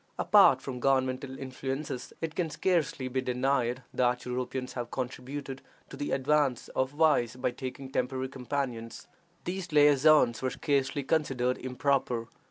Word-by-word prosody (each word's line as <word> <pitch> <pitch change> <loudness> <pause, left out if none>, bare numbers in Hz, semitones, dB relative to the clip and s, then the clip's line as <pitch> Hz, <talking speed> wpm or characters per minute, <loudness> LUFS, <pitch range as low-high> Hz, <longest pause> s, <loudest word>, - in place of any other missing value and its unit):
Apart - - +5
from 125 -2 -5
governmental 130 0 0
influences, 135 0 -5
it 165 -1 -3
can 165 -1 -1
scarcely 150 -4 0
be 130 +1 -1
denied 125 0 0
that 125 0 +1
Europeans 125 +1 -3
have 120 -2 -4
contributed 130 +2 -5 0.3
to - - -7
the 145 - -4
advance 140 -2 +1
of 130 0 0
vice 145 -6 +2
by 125 0 -1
taking 130 +1 -7
temporary 130 0 -1
companions. 125 -3 -4 0.4
These 180 -1 -4
liaisons 145 -4 +5
were 130 - 0
scarcely 140 0 0
considered 130 -4 0
improper. 125 -2 0
130 Hz, 135 wpm, -29 LUFS, 125-145 Hz, 0.4 s, Apart